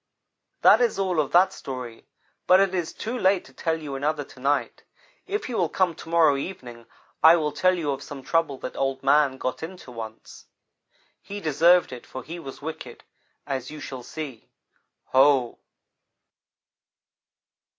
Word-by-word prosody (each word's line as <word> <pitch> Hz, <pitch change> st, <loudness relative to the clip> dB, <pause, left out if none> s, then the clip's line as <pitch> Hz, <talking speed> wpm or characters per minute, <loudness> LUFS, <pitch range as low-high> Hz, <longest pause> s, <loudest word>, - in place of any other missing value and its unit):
"That -, -, +7 dB
is 235 Hz, -4 st, +2 dB
all 185 Hz, -4 st, 0 dB
of 145 Hz, -, 0 dB
that 180 Hz, +2 st, +5 dB
story, 125 Hz, -4 st, -8 dB, 0.4 s
but 185 Hz, +1 st, +7 dB
it 195 Hz, -1 st, +2 dB
is 175 Hz, -3 st, -2 dB
too 230 Hz, +3 st, -5 dB
late 190 Hz, -5 st, +2 dB
to 135 Hz, -, -17 dB
tell 160 Hz, +4 st, -1 dB
you 150 Hz, -3 st, -7 dB
another 145 Hz, +2 st, -1 dB
to 135 Hz, -, -16 dB
night. 140 Hz, +3 st, -1 dB, 0.4 s
If 415 Hz, +2 st, -3 dB
you 250 Hz, -, -4 dB
will 170 Hz, -3 st, +1 dB
come 185 Hz, -3 st, +1 dB
to 165 Hz, -, -12 dB
morrow 160 Hz, -4 st, +4 dB
evening, 120 Hz, -8 st, -7 dB, 0.3 s
I 160 Hz, +1 st, +8 dB
will 155 Hz, -3 st, 0 dB
tell 185 Hz, +6 st, +2 dB
you 150 Hz, -4 st, -1 dB
of 135 Hz, -, -4 dB
some 140 Hz, -2 st, -9 dB
trouble 165 Hz, -1 st, 0 dB
that -, -, -6 dB
Old 135 Hz, 0 st, -2 dB
man 140 Hz, -1 st, +3 dB
got 130 Hz, -1 st, -3 dB
into 165 Hz, -5 st, -8 dB
once. 110 Hz, -2 st, -10 dB, 0.7 s
He 205 Hz, +1 st, -7 dB
deserved 170 Hz, -1 st, +4 dB
it, 125 Hz, -, -10 dB
for 130 Hz, -, -8 dB
he 170 Hz, +5 st, -7 dB
was 135 Hz, -3 st, -10 dB
wicked, 160 Hz, +1 st, -7 dB, 0.4 s
as 130 Hz, -3 st, -4 dB
you 155 Hz, -, -8 dB
shall 135 Hz, -3 st, -7 dB
see. 135 Hz, -2 st, -8 dB, 0.6 s
Ho!" 130 Hz, -2 st, +4 dB
150 Hz, 165 wpm, -25 LUFS, 135-175 Hz, 0.7 s, I